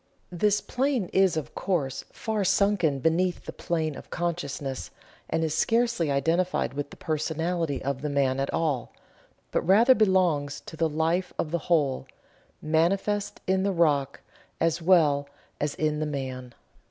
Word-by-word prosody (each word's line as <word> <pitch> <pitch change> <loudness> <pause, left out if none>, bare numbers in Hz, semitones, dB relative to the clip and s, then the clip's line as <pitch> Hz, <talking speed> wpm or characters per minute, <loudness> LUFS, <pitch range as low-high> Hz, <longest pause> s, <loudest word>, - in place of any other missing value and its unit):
This 205 +4 +2
plane 255 -7 -1
is, 190 -3 +3
of 155 - -4
course, 140 -8 -2
far 220 -2 -2
sunken 185 -6 +2
beneath 175 +3 +1
the - - -6
plane 160 -4 -2
of - - -11
consciousness, 145 -6 -3 0.4
and 165 - 0
is 155 -2 0
scarcely 230 -2 +1
identified 165 +6 +1
with 145 0 -4
the - - -13
personality 160 -1 -2
of 140 -1 -2
the 150 - -2
man 135 -2 +1
at 135 - -1
all, 145 -7 -1 0.6
but - - +1
rather 225 +8 +6
belongs 180 - +2
to - - -10
the 160 0 +1
life 165 +4 0
of 155 - -2
the 170 - 0
whole, 145 -6 +1 0.6
manifest 190 +6 0
in 190 0 +2
the 200 +1 +1
rock 145 -6 +1 0.4
as 165 0 +1
well 150 -5 +3 0.3
as 145 0 -1
in 155 -1 0
the 155 - -1
man. 130 -3 -5
160 Hz, 155 wpm, -27 LUFS, 145-185 Hz, 0.6 s, rather